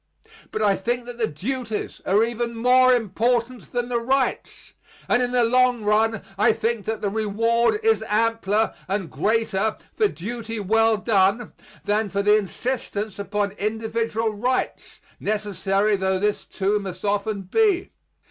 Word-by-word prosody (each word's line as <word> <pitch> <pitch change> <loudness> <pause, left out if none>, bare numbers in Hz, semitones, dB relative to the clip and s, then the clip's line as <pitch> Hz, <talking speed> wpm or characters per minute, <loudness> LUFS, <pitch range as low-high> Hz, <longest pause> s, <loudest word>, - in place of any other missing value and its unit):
But 215 - -2
I 200 -2 +4
think 240 +4 -2
that 245 0 -9
the 225 - +2
duties 220 - -4
are 205 +3 +4
even 235 0 -2
more 255 +2 +5
important 235 +1 0
than 245 0 -1
the 240 -1 0
rights; 260 +3 -1 0.3
and 245 - +3
in 245 - +1
the 245 -1 +2
long 250 0 +3
run 220 +1 +2 0.2
I 220 +2 +5
think 225 -2 -2
that 220 -1 -2
the 205 - 0
reward 230 - +1
is 445 0 +3
ampler 220 0 +1
and 195 -3 -2
greater 220 -1 0 0.2
for 430 - +3
duty 230 - -6
well 225 +2 +3
done, 205 +1 +1 0.3
than 210 0 +1
for 200 +1 -1
the 210 +1 +5
insistence 215 -1 -3
upon 200 0 -1
individual 225 +1 -1
rights, 245 +5 -2 0.2
necessary 205 0 0
tho 190 -1 0
this, 210 +2 -1
too, 200 +2 0
must 195 0 -7
often 205 0 -1
be. 390 - +1
220 Hz, 150 wpm, -23 LUFS, 205-240 Hz, 0.3 s, more